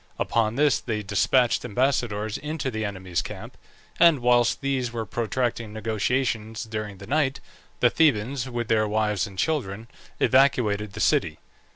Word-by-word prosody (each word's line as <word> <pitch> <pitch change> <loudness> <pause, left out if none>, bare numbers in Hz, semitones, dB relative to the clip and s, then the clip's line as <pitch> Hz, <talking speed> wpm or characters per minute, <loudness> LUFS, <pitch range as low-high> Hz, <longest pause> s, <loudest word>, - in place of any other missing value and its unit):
Upon 115 -1 0
this 145 +1 +3
they 110 -3 -3
despatched 115 +5 +2
ambassadors 115 -3 -1
into 150 -2 -3
the 110 -1 -3
enemy's 95 -3 -3
camp; - - -9 0.4
and 170 -3 +6
whilst 120 +1 +3
these 135 -3 -1
were 115 -1 -4
protracting 115 0 -2
negotiations 110 0 -1
during 105 -3 -5
the 100 - -10
night, 140 +1 0 0.4
the 120 - +5
Thebans, 130 -3 +1
with 120 -2 -3
their 110 -1 +2
wives 105 -1 0
and 95 -2 -13
children, 115 - -2 0.3
evacuated 110 -7 +2
the - - -7
city. 80 -1 +2
115 Hz, 145 wpm, -25 LUFS, 105-130 Hz, 0.4 s, and